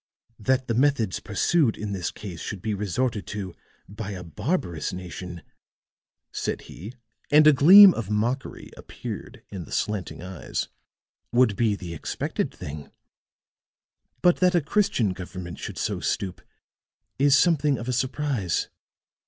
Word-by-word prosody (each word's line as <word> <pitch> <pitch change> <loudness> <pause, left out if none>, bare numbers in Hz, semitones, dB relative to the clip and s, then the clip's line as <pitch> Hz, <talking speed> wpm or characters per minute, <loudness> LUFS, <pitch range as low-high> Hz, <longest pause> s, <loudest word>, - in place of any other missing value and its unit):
"That 130 +4 +1
the 115 - 0
methods 120 -6 +1
pursued 115 +5 +1
in 105 -1 -4
this 95 -4 -2
case 90 -6 -8
should 100 -5 -6
be 110 - -1
resorted 105 +3 -2
to 100 -4 -5 0.3
by 105 +1 -6
a 90 -2 -7
barbarous 85 - -2
nation," 90 -1 -7 0.9
said - - -3
he, 105 - -10 0.3
and 150 +1 +6
a 155 - +8
gleam 185 +8 +9
of 110 -4 -5
mockery 115 +5 -2
appeared - - -8
in 95 -4 -7
the - - -15
slanting 100 -5 -3
eyes, 90 -2 -4 0.6
"would 120 -4 +3
be 110 -1 +2
the 90 -4 -7
expected 80 - -3
thing; 70 -1 -8 1.3
but 175 -1 +5
that 180 0 +3
a 175 - +4
Christian 140 - +1
government 90 -1 -8
should - - -6
so - - -2
stoop 95 -2 -2 0.8
is 140 0 +5
something 150 -5 +3
of 120 - -7
a 130 - 0
surprise." 130 - -1
105 Hz, 140 wpm, -25 LUFS, 95-135 Hz, 1.3 s, gleam